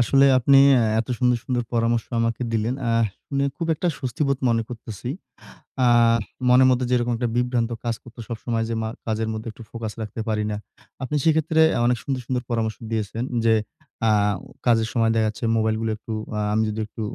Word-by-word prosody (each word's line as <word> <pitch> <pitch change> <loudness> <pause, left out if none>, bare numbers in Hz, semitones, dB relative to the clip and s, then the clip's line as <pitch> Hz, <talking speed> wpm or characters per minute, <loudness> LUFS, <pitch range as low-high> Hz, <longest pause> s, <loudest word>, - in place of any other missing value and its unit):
আসলে 135 +3 +4
আপনি 135 +2 +5 0.2
এ - - +3 0.2
এত 120 - -6
সুন্দর, 125 -1 +3
সুন্দর 125 -2 -1
পরামর্শ 115 0 +1 0.2
আমাকে 115 +1 -1
দিলেন। 115 +3 0
আ - - +2 0.4
শুনে 140 0 0
খুব 170 - -3
একটা 175 - -1
স্বস্তিবোধ 140 +1 -1
মনে 115 -1 +2
করতেছি, 115 -2 -7 0.8
আ - - +5 0.6
মনের 130 +1 +6
মধ্যে 125 0 +1
যেরকম 120 -1 +2
একটা 120 0 -1
বিভ্রান্ত 120 -1 +1
কাজ 115 -1 -1
করত 120 0 -15
সবসময়, 115 -1 -2
যে - - -1
মা 110 - -2 0.2
কাজের 110 0 -1
মধ্যে 110 +1 -6
একটু 115 - -12
ফোকাস 115 -2 -5
রাখতে 110 +1 -5
পারি 105 -1 0
না। 105 - -2 0.5
আপনি 130 +4 -2
সেক্ষেত্রে 160 0 +3 0.2
আ - - 0
অনেক 120 -1 +2
সুন্দর, 135 -2 -2
সুন্দর 125 0 -1
পরামর্শ 110 -2 -1
দিয়েছেন 110 +1 -2 0.2
যে 115 - +5 0.6
আ - - +4 0.5
কাজের 115 -2 +3
সময় 115 -2 +2
দেখা 110 -1 +2
যাচ্ছে 110 +2 -5
মোবাইলগুলো 110 0 0
একটু 110 - -10 0.3
আ - - -1
আমি 110 +1 +2
যদি 105 - -4
একটু 110 - -9
115 Hz, 190 wpm, -23 LUFS, 110-125 Hz, 0.8 s, মনের